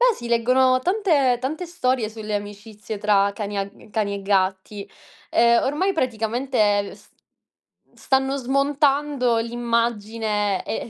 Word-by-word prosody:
Beh, - - +4
si 240 - -8
leggono 255 +2 +3
tante 315 - +2
tante 310 +7 -4
storie 255 -9 -1
sulle 215 -1 -6
amicizie 205 +1 -8
tra 200 -1 +2
cani 205 0 -4
a 195 0 -2 0.2
cani 205 -2 -1
e 200 - -6
gatti. 195 +1 -1 0.4
Ehm, 235 0 +4
ormai 305 +9 0
praticamente, 225 - 0
s - - -20 0.9
stanno 270 0 0
smontando 275 -1 +1
l'immagine 225 -3 -1
e 225 - -4
235 Hz, 120 wpm, -22 LUFS, 210-265 Hz, 0.9 s, Beh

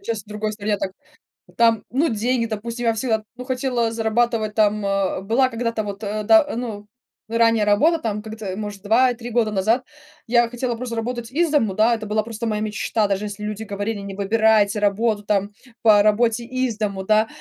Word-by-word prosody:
Сейчас 230 - -4
в - - -44
другой 210 0 -3
стране 210 0 -1
так 190 - -3 0.7
там, 230 -2 +4
ну, 290 +6 +2
деньги, 230 +2 0
допустим. 230 +2 -4
Я 230 - +3
всегда, 220 -1 -1
ну, 250 - -7
хотела 250 -3 -1
зарабатывать 225 -1 0
там, 210 -1 +2
а, 195 -1 0
была 240 +6 +2
когда-то 230 -2 -2
вот, 205 +1 -6
э, 210 +1 -3
да, 325 +6 +6
ну, 215 -4 -5 0.4
ранее 230 -2 +3
работа 305 +12 +3
там. 210 -4 -3
Как-то, 215 -3 -6
может, 205 -1 -6
2-3 240 +2 +2
года 225 -2 +1
назад 220 +6 +1 0.4
я 240 0 +4
хотела 245 0 -2
просто 235 0 -5
работать 235 0 -4
из 330 +3 +1
дому, 225 -10 +2
да, 220 +4 +3
это 220 -1 -3
была 215 +1 0
просто 230 0 -5
моя 215 -1 -1
мечта. 215 0 -1
Даже 195 +1 -1
если 205 0 -7
люди 210 +1 -4
говорили: 205 +1 -3
"Не 200 -1 -7
выбирайте 210 0 +3
работу 210 +1 +1
там 200 0 0 0.3
по 215 -2 +6
работе 225 +2 +2
из 255 -2 -2
дому", 200 -3 -2
да, 215 +2 +3
220 Hz, 190 wpm, -22 LUFS, 210-235 Hz, 0.7 s, да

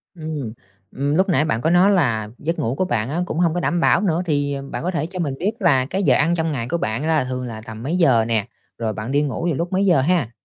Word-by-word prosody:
Ừm, 155 -8 -5 0.4
ừm, 140 +2 -1
lúc 190 +3 +2
nãy 160 -3 +3
bạn 115 -7 -1
có 160 - +1
nói 180 +4 +5
là 115 - +1
giấc 165 +3 -3
ngủ 115 +3 -1
của 185 - +1
bạn 115 -7 -1
á, 165 +5 -1
cũng 165 - -3
hông 170 -2 +2
có 175 - -1
đảm 175 0 0
bảo 175 - +3
nữa, 175 -4 +1
thì 145 -3 0 0.2
bạn - - -4
có 180 - -1
thể 165 -3 -1
cho 185 +2 -7
mình 150 -6 -1
biết 195 +5 0
là 145 - +3
cái 190 +8 -2
giờ - - +4
ăn 165 +4 +2
trong 160 -1 -1
ngày 120 -5 -3
của 170 - 0
bạn 110 0 -2
là 160 -3 +2
thường 125 0 -4
là 110 -3 -7
tầm 110 0 -9
mấy 160 +7 -1
giờ 130 -10 +4
nè, 110 -2 0 0.3
rồi 110 -2 -2
bạn 110 +4 -5
đi 145 +1 +2
ngủ 150 +3 -2
vào 170 - +1
lúc 170 +5 -3
mấy 190 +1 +1
giờ 175 -8 +4
ha? 160 -4 +1
155 Hz, 285 wpm, -21 LUFS, 125-175 Hz, 0.4 s, nói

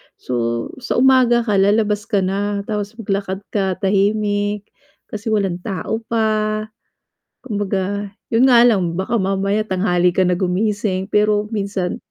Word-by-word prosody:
so 115 -1 -2
sa 250 - -3
umaga 250 -2 +4
ka 210 -4 +1
lalabas 210 +1 +2
ka 205 -4 +1
na, 200 +2 -1
tapos 210 0 -4
maglakad 195 -1 -2
ka, 190 -3 0
tahimik, 205 +1 +1 0.5
kasi 215 +2 -6
walan' 195 -4 0
tao 200 +1 -3
pa, 215 -1 0 0.8
kumbaga, 200 -3 -2 0.2
'yon 235 +3 +4
nga 235 -1 +7
lang 185 -7 +1
baka 190 +7 -2
mamaya 195 +1 0
tanghali 180 -3 +1
ka 190 - +2
na 180 - +2
gumising, 195 +1 -1
pero 210 0 +2
minsan 195 -3 -2
205 Hz, 135 wpm, -19 LUFS, 190-215 Hz, 0.8 s, nga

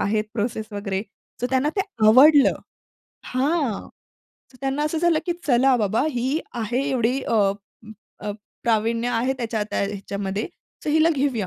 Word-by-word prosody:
आहेत 210 +1 +1
प्रोसेस 220 0 -2
वगैरे. 200 -1 -3 0.4
सो 245 - 0
त्यांना 265 +2 +2
ते - - +2 0.3
आवडलं 280 +5 +7 0.7
हां. 270 -3 -1 0.6
तर 255 - -17
त्यांना 270 +2 -1
असं 310 +1 -1
झालं 340 -1 +3
की 345 - +1
चला 260 -1 +4
बाबा 215 +1 +1
ही 260 +3 -1 0.2
आहे 240 +5 -1
एवढी 255 0 +1
अ, - - -1 0.9
अ, 210 - -4 0.3
प्रावीण्य 230 +1 +1
आहे 245 +2 +1
त्याच्या 230 -4 -2
त्या - - -1
ह्याच्यामध्ये. 200 0 -4 0.4
सो 300 - 0
हिला 315 +2 +4
घेऊया. 265 -7 0
245 Hz, 145 wpm, -23 LUFS, 215-275 Hz, 0.9 s, आवडलं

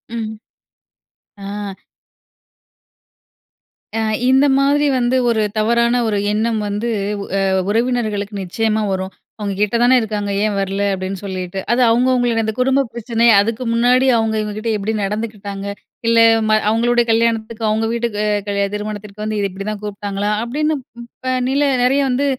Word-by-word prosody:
ம். 220 -1 -4 1.0
ஆ. 200 0 -6 2.2
அ - - 0 0.3
இந்த 265 +2 +5
மாதிரி 285 +1 +3
வந்து 245 +1 +1
ஒரு 225 -2 +2 0.2
தவறான 235 +2 +2
ஒரு 210 -2 0
எண்ணம் 220 +2 0
வந்து 205 +3 -2 0.5
அ - - +1 0.3
உறவினர்களுக்கு 220 -3 -1
நிச்சயமா 220 +4 0
வரும். 190 0 -3 0.3
"அவுங்க 205 -2 -3
கிட்ட 210 +2 +1
தான 255 +1 +5
இருக்காங்க. 210 -2 -3
ஏன் 210 -1 -1
வரல?" 195 +1 -1
அப்டின்னு 190 0 -4
சொல்லிட்டு. 185 -1 -4
அது 240 +2 +3
அவுங்கவுங்கள்து 245 -1 +2
அந்த 220 - -2
குடும்ப 265 +2 +3
பிரச்சனைய 235 0 +2
அதுக்கு 230 +4 -2
முன்னாடி 250 +3 +3
அவுங்க 225 -1 0
இவுங்ககிட்ட 215 +2 -4
எப்டி 210 +2 -2
நடந்துக்கிட்டாங்க 205 -1 -4 0.4
இல்ல 230 0 +4 0.3
ம - - +3 0.2
அவங்களுடய 240 +2 +2
கல்யாணத்துக்கு 225 0 0
அவுங்க 220 +1 +1
வீட்டுக்கு 235 -3 -2 0.3
கல் 200 0 -1
திருமணத்திற்கு 210 0 -6
வந்து 215 0 -2
இத 200 - +1
இப்டிதான் 200 +2 -5
கூப்ட்டாங்களா? 205 0 -3
அப்டின்னு 300 +6 -1
ப் - - -54 0.2
இப்ப 255 - -12 0.2
நில 275 +2 +1 0.2
நெறய 270 +3 +3
வந்து 260 +3 +1
220 Hz, 140 wpm, -18 LUFS, 205-235 Hz, 2.2 s, இந்த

